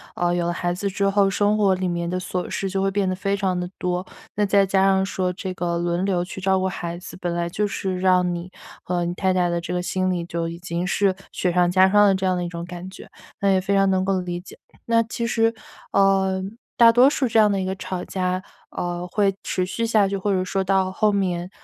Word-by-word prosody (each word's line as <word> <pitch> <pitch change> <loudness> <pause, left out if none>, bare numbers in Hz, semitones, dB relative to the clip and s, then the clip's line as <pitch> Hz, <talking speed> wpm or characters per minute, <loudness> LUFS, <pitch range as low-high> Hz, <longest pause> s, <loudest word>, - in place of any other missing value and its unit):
呃， 175 0 +1
有 175 -1 0
了 175 - 0
孩 175 0 -1
子 200 +3 -2
之 200 +1 0
后， 195 0 +3
生 205 +2 +1
活 200 -3 +3
里 185 0 -2
面 170 0 -2
的 180 - -1
琐 180 0 -4
事 195 - -2
就 195 0 -1
会 195 - +2
变 195 -1 0
得 - - 0
非 195 +1 -1
常 190 -2 -1
地 180 0 -4
多。 180 0 -2 0.4
再 200 0 +4
加 190 0 +2
上 190 0 +3
说 185 -2 -2
这 185 +1 -5
个， 175 -2 -2
轮 175 +2 -1
流 185 -3 +1
去 180 - -8
照 190 0 +2
顾 190 - 0
孩 170 -2 -5
子， 180 - -10
本 175 -1 -2
来 170 0 -2
就 205 +4 -1
是 190 -2 -3
让 180 -1 +3
你 175 +1 -6 0.4
和 175 -1 -1
你 175 0 -2
太 190 +1 0
太 180 -1 +1
的 170 0 -1
这 170 +1 -5
个 180 - 0
心 185 +1 -1
理， 180 -2 -1
就 170 -1 -3
已 165 0 -6
经 175 0 -3
是 195 +1 +2 0.2
雪 180 - 0
上 175 0 +3
加 185 +1 +5
霜 205 +1 +5
的 195 - +4
这 190 0 -2
样 185 -1 +1
的 175 - -2
一 - - -3
种 170 -1 -6
感 180 +1 -8
觉， 190 - -12 0.3
那 200 - +3
也 190 - +3
非 195 +2 0
常 195 0 +4
能 190 0 +1
够 190 -1 +1
理 175 -1 -4
解。 180 - -13 0.3
那 230 0 +3
其 230 +1 -3
实， 225 0 +2 0.4
呃， 190 -1 +2 0.4
大 235 -1 +8
多 250 +3 +6
数 280 -2 0
这 225 - 0
样 210 -1 +5
的 195 - 0
一 190 - -2
个 190 0 -2
吵 185 -1 -5
架， 185 -1 -2 0.3
呃， 175 0 -4
会 195 +1 +1
持 185 - -1
续 230 +5 -2
下 215 -3 +3
去， 200 - -2
或 200 +1 -1
者 185 -1 +1
说 195 +1 -1
到 190 0 +1
后 210 +2 +2
面， 180 -3 -1
185 Hz, 275 characters per minute, -23 LUFS, 180-195 Hz, 0.4 s, 大